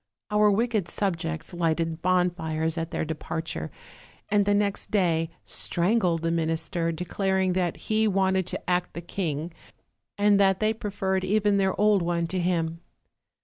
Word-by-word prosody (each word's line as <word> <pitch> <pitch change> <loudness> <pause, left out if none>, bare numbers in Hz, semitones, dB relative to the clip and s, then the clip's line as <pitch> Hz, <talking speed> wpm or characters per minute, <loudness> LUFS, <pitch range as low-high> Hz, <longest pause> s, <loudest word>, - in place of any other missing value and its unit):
Our 210 0 +5
wicked 215 -3 +1
subjects 170 -4 -3
lighted 165 -1 -1
bonfires 170 -3 0
at 165 -1 -3
their - - -2
departure, 155 - -4 0.6
and 205 -1 +3
the 205 - +4
next 205 -1 0
day 165 -5 +1 0.2
strangled 175 -2 +1
the 165 - +1
minister, 165 +1 -1
declar 185 +3 -1
ing 185 -1 +2
that 180 -2 0
he 220 0 +1
wanted 190 -2 +1
to - - -4
act 180 0 0
the 170 - -4
king, 165 -2 -3 0.6
and 205 0 +4
that 195 -1 +4
they 215 0 +2
pre 215 -1 -5
ferred 190 -1 -1
even 205 +1 +2
their 190 -1 +1
old 210 -2 +4
one 170 0 0
to 185 - -1
him. 165 -2 -1
180 Hz, 155 wpm, -26 LUFS, 165-200 Hz, 0.6 s, Our